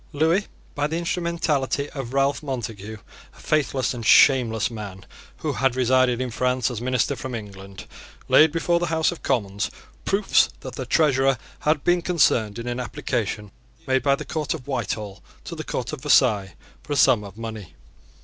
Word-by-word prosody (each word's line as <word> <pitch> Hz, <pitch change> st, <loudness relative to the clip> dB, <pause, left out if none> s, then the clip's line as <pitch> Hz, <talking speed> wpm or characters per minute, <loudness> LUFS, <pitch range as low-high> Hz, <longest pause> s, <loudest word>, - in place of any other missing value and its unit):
Lewis, 165 Hz, +7 st, +2 dB, 0.3 s
by 145 Hz, +1 st, 0 dB
the 160 Hz, +2 st, -3 dB
instrumentality 165 Hz, -5 st, -1 dB
of 135 Hz, -4 st, -6 dB
Ralph 135 Hz, +1 st, +1 dB
Montague, 115 Hz, -6 st, -5 dB, 0.4 s
a -, -, -18 dB
faithless 140 Hz, -5 st, 0 dB
and 120 Hz, -2 st, -6 dB
shameless 115 Hz, -2 st, +5 dB
man 100 Hz, -4 st, -8 dB, 0.3 s
who -, -, -3 dB
had 130 Hz, +3 st, +1 dB
resided 130 Hz, -1 st, +3 dB
in 130 Hz, -1 st, -3 dB
France 125 Hz, +1 st, 0 dB
as 115 Hz, -2 st, -5 dB
minister 125 Hz, +2 st, 0 dB
from 130 Hz, -2 st, -6 dB
England, 100 Hz, -3 st, -9 dB, 0.4 s
laid 155 Hz, 0 st, +6 dB
before 170 Hz, +1 st, +1 dB
the 175 Hz, -, -1 dB
House 160 Hz, 0 st, +1 dB
of 175 Hz, -, -9 dB
Commons 100 Hz, -3 st, -1 dB, 0.3 s
proofs 195 Hz, 0 st, +3 dB
that -, -, -8 dB
the -, -, -6 dB
Treasurer 135 Hz, -4 st, +3 dB, 0.2 s
had 150 Hz, -1 st, +1 dB
been 175 Hz, 0 st, +2 dB
concerned 145 Hz, -, +2 dB
in 115 Hz, -, -6 dB
an 120 Hz, 0 st, -3 dB
application 105 Hz, -4 st, -3 dB, 0.3 s
made 130 Hz, 0 st, +1 dB
by 140 Hz, +2 st, +3 dB
the -, -, -8 dB
Court 155 Hz, -1 st, -2 dB
of 140 Hz, -5 st, -11 dB
Whitehall 105 Hz, -7 st, -4 dB, 0.2 s
to -, -, -7 dB
the 155 Hz, -, -5 dB
Court 125 Hz, -2 st, -4 dB
of 150 Hz, -, -6 dB
Versailles 115 Hz, -, +3 dB, 0.3 s
for -, -, -5 dB
a -, -, -1 dB
sum 120 Hz, -5 st, +4 dB
of 100 Hz, 0 st, -11 dB
money. 110 Hz, -5 st, -7 dB
130 Hz, 175 wpm, -23 LUFS, 115-150 Hz, 0.4 s, laid